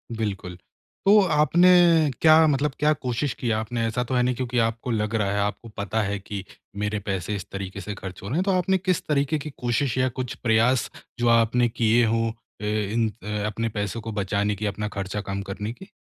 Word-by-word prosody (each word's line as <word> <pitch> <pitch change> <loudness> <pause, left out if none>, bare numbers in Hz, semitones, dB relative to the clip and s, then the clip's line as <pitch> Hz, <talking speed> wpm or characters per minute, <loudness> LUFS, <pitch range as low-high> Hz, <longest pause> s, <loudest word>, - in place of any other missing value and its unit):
बिल्कुल। 100 -5 -4 0.5
तो 210 +2 +7
आपने 155 +4 +5 0.5
क्या 160 0 +7
मतलब 145 0 +1
क्या 150 +1 +3
कोशिश 130 0 -2
की 120 -2 -2
आपने? 115 +2 -1
ऐसा 125 +2 -1
तो 130 - -5
है 125 - +3
नहीं 125 0 +1
क्योंकि 125 0 -3
आपको 115 +2 -1
लग 110 0 -1
रहा 100 -2 +1
है, 100 - 0
आपको 105 +3 -2
पता 105 +2 -1
है 100 +1 -2
कि 100 0 -6 0.3
मेरे 105 0 -1
पैसे 100 0 -3
इस 100 - -5
तरीके 100 0 -6
से 105 - -5
ख़र्च 95 -2 -8
हो - - -6
रहे 140 - -1
हैं। 185 - +2
तो 195 - +1
आपने 185 +1 +2
किस 185 -1 0
तरीके 150 +1 +1
की 150 - -6
कोशिश 120 +1 0
या 130 0 +2
कुछ 125 -1 -3
प्रयास 120 +2 +2 0.3
जो 120 - +1
आपने 115 +1 +3
किए 115 0 +3
हों 115 +1 +1 0.3
अ, - - -4
इन 110 +2 0
अ, - - -8 0.2
अपने 115 +2 -2
पैसों 105 +2 -3
को 110 +1 -6
बचाने 100 0 -1
की, 105 +2 -4
अपना 105 +1 -2
ख़र्चा 100 +1 -3
कम 100 0 -4
करने 105 +3 -4
की? 190 +9 -13
115 Hz, 215 wpm, -24 LUFS, 105-130 Hz, 0.5 s, तो